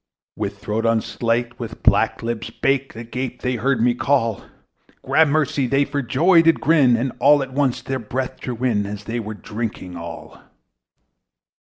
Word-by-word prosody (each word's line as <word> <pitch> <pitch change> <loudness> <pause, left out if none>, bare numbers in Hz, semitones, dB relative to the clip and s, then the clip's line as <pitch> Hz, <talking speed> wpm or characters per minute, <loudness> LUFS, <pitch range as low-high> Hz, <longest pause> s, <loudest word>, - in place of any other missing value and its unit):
With 100 -1 -4
throats 110 +3 -2
unslaked, 115 +1 -1
with - - -7
black - - +3
lips 115 -1 -3
baked, 135 -1 -1
Agape 125 +2 -5
they 125 -1 0
heard 125 0 +1
me 120 0 +4
call: 120 -4 0 0.6
Gramercy! 150 -3 +2
they 140 +3 +2
for 140 0 -2
joy 165 +8 +4
did 165 0 +3
grin, 140 -6 +4
And 125 +3 -1
all 145 +3 +5
at 130 -1 -9
once 130 -3 0
their 135 0 -3
breath 130 +3 -4
drew 125 -2 -5
in, 105 -5 +1
As 105 0 -6
they 115 +3 -3
were 110 -1 -5
drinking 105 -4 -6
all. 85 0 -9
125 Hz, 160 wpm, -21 LUFS, 115-135 Hz, 0.6 s, all